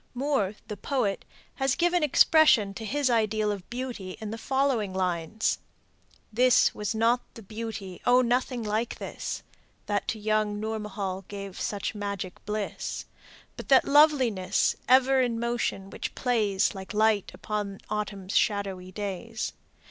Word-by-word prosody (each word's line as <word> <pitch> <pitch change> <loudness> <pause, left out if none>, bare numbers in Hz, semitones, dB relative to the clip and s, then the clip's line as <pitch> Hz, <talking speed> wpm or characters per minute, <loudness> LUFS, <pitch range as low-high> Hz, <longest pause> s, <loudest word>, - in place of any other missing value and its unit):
Moore, 245 -7 0
the 210 - -5
poet, 240 -8 -1 0.3
has 270 0 +1
given 350 0 +2
expression 300 -8 +5
to 220 +2 -7
his 285 +5 0
ideal 215 -3 +2
of 195 -3 -6
beauty 240 -7 -5
in 215 -1 -5
the 225 - -4
following 255 -7 0
lines: 180 +2 0 0.7
"This 250 +2 +5
was 210 +1 -3
not 230 +2 +3
the 225 - -10
beauty 210 -3 -6
Oh, 250 +1 +5
nothing 245 0 0
like 215 +2 -1
this, - - -5 0.4
That 205 -1 -1
to 225 - -1
young 215 -1 0
Nourmahal 210 -3 -4
gave 200 -2 -7
such 205 -1 -2
magic 200 -3 -5
bliss; 210 -1 -3 0.5
But - - -9
that 265 -2 +6
loveliness, 275 -10 +4
ever 260 +1 +5
in 235 -2 0
motion, 235 -5 -2
which - - -5
plays 215 -6 +1
Like 190 +1 -8
the - - -4
light 215 -2 +3
upon 205 -2 -4
autumn's 200 -2 -4
shadowy 195 -3 0
days. 205 +3 -4
215 Hz, 140 wpm, -27 LUFS, 200-245 Hz, 0.7 s, that